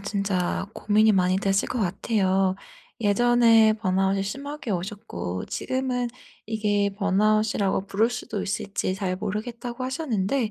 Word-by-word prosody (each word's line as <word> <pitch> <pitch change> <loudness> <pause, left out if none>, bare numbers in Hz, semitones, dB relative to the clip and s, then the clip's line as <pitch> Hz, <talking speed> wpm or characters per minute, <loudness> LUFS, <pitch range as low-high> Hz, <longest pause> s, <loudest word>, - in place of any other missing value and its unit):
진짜 195 -3 -1
고민이 215 +1 +3
많이 185 -1 +3
됐을 195 0 +1
것 250 - -2
같아요. 190 -1 +1 0.4
예전에 225 0 +5
번아웃이 195 -2 +1
심하게 275 +4 -5
오셨고 175 - -4
지금은 255 -2 -2 0.4
이게 205 -2 +1
번아웃이라고 205 0 +1
부를 200 +4 +2
수도 215 -3 -4
있을지 200 -1 -2
잘 190 -2 -2
모르겠다고 235 +5 -4
하셨는데 255 -4 -1
205 Hz, 310 characters per minute, -25 LUFS, 195-230 Hz, 0.4 s, 예전에